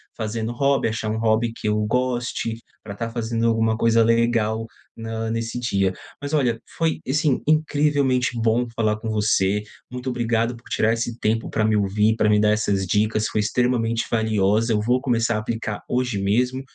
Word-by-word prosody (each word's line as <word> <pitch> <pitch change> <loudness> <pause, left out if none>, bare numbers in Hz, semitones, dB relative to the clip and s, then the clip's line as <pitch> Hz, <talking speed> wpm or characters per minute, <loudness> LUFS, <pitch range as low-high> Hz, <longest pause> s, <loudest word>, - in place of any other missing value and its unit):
fazendo 110 +1 -3
hobby, 140 0 +1
achar 110 0 -3
um 110 - -1
hobby 110 +1 +1
que - - -5
eu 105 - +2
goste, 120 -1 -1 0.2
pra 100 - -7
tá 115 +3 -4
fazendo 115 0 -1
alguma 110 -1 +1
coisa 115 0 +4
legal 115 -1 +1 0.3
na 115 0 -4
nesse 115 +1 -3
dia. 100 -6 0 0.3
Mas 145 +1 -5
olha, 125 -6 +1 0.2
foi, 165 -1 0
assim, 145 0 +1
incrivelmente 145 -4 +2
bom 115 +1 +1
falar 110 -2 +1
com 110 +1 -5
você, 105 -1 +1 0.3
muito 125 +1 -4
obrigado 120 -1 0
por 115 - -19
tirar 110 - +2
esse 115 0 -3
tempo 110 +1 0
pra 110 - 0
me 110 0 +2
ouvir, 105 +2 +2
pra 105 - +2
me 105 0 +4
dar 105 0 +3
essas 100 -2 0
dicas, 110 +3 +1
foi - - -2
extremamente 115 0 0
valiosa, 110 0 +2
eu 105 - +1
vou 125 +4 +2
começar 115 -3 +1
a - - 0
aplicar 110 -1 -4
hoje 125 -4 -1
mesmo, 125 +6 +1
115 Hz, 180 wpm, -22 LUFS, 110-120 Hz, 0.3 s, coisa